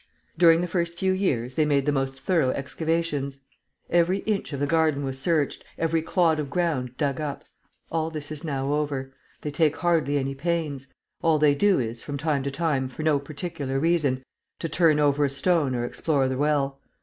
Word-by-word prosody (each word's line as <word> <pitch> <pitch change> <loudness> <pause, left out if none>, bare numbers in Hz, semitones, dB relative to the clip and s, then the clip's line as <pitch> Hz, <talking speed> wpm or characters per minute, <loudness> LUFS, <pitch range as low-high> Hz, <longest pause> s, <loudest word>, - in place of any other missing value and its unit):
During 165 -1 +6
the 180 - -1
first 170 0 -1
few 190 +2 +1
years 130 -11 0
they 155 - +2
made 140 -2 +2
the 150 - +2
most 135 -1 -2
thorough 160 -5 +2
excavations. 145 0 -2 0.5
Every 175 +2 +3
inch 210 -5 -1
of 140 - -4
the 145 - +1
garden 155 -1 +2
was 135 -1 -3
searched, 155 -1 0
every 165 0 +1
clod 165 -1 +2
of 145 -2 -3
ground 140 -7 -1
dug 140 -1 -1
up. 145 -2 -4 0.5
All 160 -1 0
this 155 -2 -6
is 150 -2 -6
now 140 -2 -1
over. 140 -3 -2 0.3
They 150 - -4
take 155 0 +2
hardly 160 -5 +2
any 135 0 -1
pains. 145 -2 -2 0.3
All 165 -2 +3
they 150 -1 +4
do 195 +5 +3
is, 115 -1 -3
from 145 -1 -5
time 145 -1 0
to 140 - -2
time, 140 -2 0
for 130 +4 -7
no 155 -2 +3
particular 140 -1 -4
reason, 145 -5 +1 0.3
to 165 - -3
turn 160 -1 +3
over 145 0 +3
a 140 - +2
stone 145 -1 +1
or 120 0 -1
explore 140 +1 0
the 130 - -1
well. 140 -1 0
150 Hz, 195 wpm, -25 LUFS, 135-165 Hz, 0.5 s, During